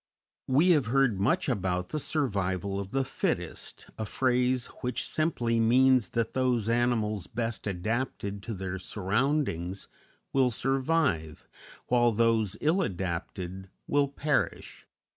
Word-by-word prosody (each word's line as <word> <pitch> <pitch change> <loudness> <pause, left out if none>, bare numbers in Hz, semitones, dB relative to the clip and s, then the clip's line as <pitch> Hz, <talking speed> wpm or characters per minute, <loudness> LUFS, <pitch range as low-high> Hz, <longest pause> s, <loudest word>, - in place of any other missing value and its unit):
We 150 +8 +4
have 145 -9 +3
heard 125 -5 +2
much 100 - +2
about 90 -7 -1
"the 155 - -2
survival 100 - -1
of 100 -1 -5
the 135 +4 0
fittest," - - -3
a 110 - -1
phrase 125 +1 +1 0.2
which 125 -1 -2
simply 120 -8 0
means 125 -1 +4
that 115 -1 0
those 125 -4 +1
animals 115 -4 +1
best 115 -2 -3
adapted 100 +1 -2
to 110 +1 -5
their 95 0 -4
surroundings 100 - -1 0.5
will 130 -2 +4
survive, 135 - 0 0.4
while 120 -1 +3
those 110 -2 +2
ill 165 +6 +2
adapted 95 - -4 0.2
will 145 -1 +2
perish. 145 +1 -2
115 Hz, 125 wpm, -29 LUFS, 100-130 Hz, 0.5 s, We